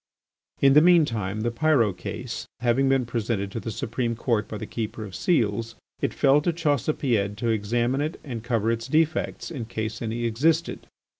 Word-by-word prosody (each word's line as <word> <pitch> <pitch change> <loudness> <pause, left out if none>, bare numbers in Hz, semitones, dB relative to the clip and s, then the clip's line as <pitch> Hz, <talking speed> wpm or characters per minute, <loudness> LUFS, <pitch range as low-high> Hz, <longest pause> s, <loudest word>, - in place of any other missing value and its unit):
In 135 -1 +6
the 150 - +8
mean 170 -1 +6
time 105 -4 -3
the 120 +1 0
Pyrot 115 -6 +2
case, 90 - -6
having 125 +3 +2
been 135 -2 +2
presented 115 -4 -2
to 115 - -4
the 115 - -5
Supreme 115 +1 -2
Court 115 -2 0
by 110 - -6
the - - -5
Keeper 110 -1 -5
of 95 - -10
Seals, 115 - 0 0.3
it - - +1
fell 140 +2 +4
to 170 - +1
Chaussepied 140 - 0
to 115 +1 -1
examine 120 +5 0
it 155 +3 -3
and 120 -6 -6
cover 115 -2 +1
its 115 0 -3
defects, 160 +3 0
in 130 -8 -5
case 110 0 -4
any 115 +1 -2
existed. 155 +9 0
120 Hz, 180 wpm, -25 LUFS, 110-140 Hz, 0.3 s, the